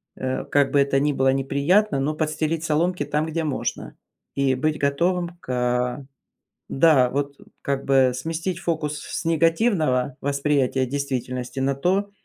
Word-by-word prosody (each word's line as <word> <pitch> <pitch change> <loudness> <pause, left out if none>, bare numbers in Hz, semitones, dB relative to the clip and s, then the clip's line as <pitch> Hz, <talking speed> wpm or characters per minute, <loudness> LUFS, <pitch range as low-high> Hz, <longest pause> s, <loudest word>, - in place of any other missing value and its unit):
э, 130 0 -3
как 145 -1 +2
бы 145 - +3
это 140 0 +2
ни 145 +1 +1
было 135 0 +2
неприятно, 140 +7 +2
но 145 +3 0
подстелить 155 +1 -1
соломки 170 +3 0
там, 150 +1 -1
где 160 +1 -2
можно. 150 -4 -4 0.4
И 135 -1 +2
быть 150 +4 -1
готовым 175 +5 0
к 125 +1 -1 0.6
да, 135 -4 +4
вот 140 +1 -2 0.3
как 140 -1 -2
бы 135 -2 +4
сместить 165 +6 -3
фокус 155 -4 -2
с - - -5
негативного 165 - +1
восприятия 140 -2 0
действительности 130 -2 -4
на 135 +1 +1
то, 190 +8 0
145 Hz, 140 wpm, -23 LUFS, 135-165 Hz, 0.6 s, да